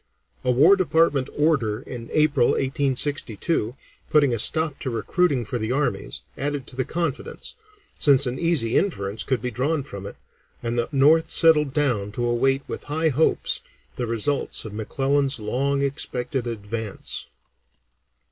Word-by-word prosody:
A 125 Hz, -, -1 dB
War 145 Hz, +10 st, +6 dB
Department 160 Hz, -7 st, +2 dB
order 140 Hz, -9 st, +1 dB
in 120 Hz, -2 st, -8 dB
April, 150 Hz, -5 st, +3 dB
1862, 135 Hz, -, -1 dB, 0.3 s
putting 145 Hz, -5 st, +4 dB
a 115 Hz, -, -1 dB
stop 155 Hz, +5 st, +3 dB
to 130 Hz, -, -3 dB
recruiting 130 Hz, +2 st, 0 dB
for 120 Hz, +4 st, -3 dB
the 110 Hz, +2 st, -2 dB
armies, 140 Hz, +2 st, -1 dB
added 145 Hz, -1 st, -3 dB
to -, -, -11 dB
the 130 Hz, 0 st, -1 dB
confidence, 165 Hz, -4 st, -3 dB, 0.5 s
since 140 Hz, -1 st, +5 dB
an 125 Hz, +1 st, -3 dB
easy 160 Hz, -10 st, +2 dB
inference 105 Hz, -, -2 dB
could 130 Hz, -2 st, -1 dB
be 125 Hz, -, -2 dB
drawn 140 Hz, +6 st, -1 dB
from 100 Hz, -7 st, -8 dB
it, -, -, -9 dB, 0.5 s
and 115 Hz, 0 st, -1 dB
the 120 Hz, -, -1 dB
North 150 Hz, +4 st, +4 dB
settled 150 Hz, -4 st, +4 dB
down 125 Hz, -9 st, 0 dB
to 120 Hz, +3 st, -2 dB
await 135 Hz, +3 st, +1 dB
with -, -, -6 dB
high 160 Hz, +2 st, 0 dB
hopes 150 Hz, +3 st, +1 dB, 0.3 s
the 120 Hz, -, -3 dB
results 115 Hz, +5 st, 0 dB
of 110 Hz, -, -7 dB
McClellan's 135 Hz, +5 st, 0 dB
long 135 Hz, +6 st, 0 dB
expected 125 Hz, -2 st, -2 dB
advance. 110 Hz, -1 st, -4 dB
135 Hz, 145 wpm, -24 LUFS, 120-150 Hz, 0.5 s, War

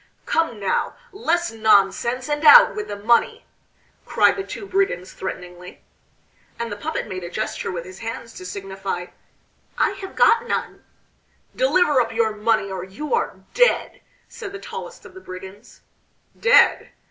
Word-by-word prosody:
"Come 325 Hz, -10 st, 0 dB
now! 195 Hz, -2 st, -1 dB, 0.2 s
Less 345 Hz, -, -1 dB
nonsense 220 Hz, +3 st, +2 dB
and 295 Hz, 0 st, -2 dB
out 485 Hz, +10 st, +9 dB
with 425 Hz, -1 st, -4 dB
the -, -, -5 dB
money!" 240 Hz, -, +1 dB, 0.6 s
cried -, -, +3 dB
the 390 Hz, -, -4 dB
two 400 Hz, -, -8 dB
brigands 380 Hz, -, -1 dB
threateningly. 180 Hz, -1 st, -8 dB, 0.7 s
And 235 Hz, -1 st, -4 dB
the -, -, -3 dB
puppet 310 Hz, +9 st, -4 dB
made 185 Hz, -3 st, -6 dB
a 175 Hz, -, -6 dB
gesture 215 Hz, +1 st, -3 dB
with 170 Hz, -2 st, -5 dB
his 185 Hz, +1 st, -11 dB
hands 230 Hz, 0 st, -6 dB
to 185 Hz, -, -10 dB
signify 195 Hz, -1 st, -5 dB, 0.7 s
"I -, -, +2 dB
have 390 Hz, -1 st, -9 dB
got 470 Hz, +1 st, +4 dB
none." -, -, -3 dB, 0.7 s
"Deliver 360 Hz, -, +3 dB
up 230 Hz, -1 st, -2 dB
your 225 Hz, -1 st, 0 dB
money 210 Hz, -2 st, 0 dB
or 185 Hz, -2 st, -4 dB
you 200 Hz, -, -6 dB
are 470 Hz, -, -1 dB
dead," -, -, +2 dB, 0.3 s
said 420 Hz, -4 st, -9 dB
the 395 Hz, -, -7 dB
tallest 470 Hz, +2 st, -9 dB
of 370 Hz, -, -13 dB
the 375 Hz, -, -12 dB
brigands. 190 Hz, -, -11 dB, 0.5 s
"Dead!" 485 Hz, +2 st, +4 dB
230 Hz, 155 wpm, -22 LUFS, -, 0.7 s, out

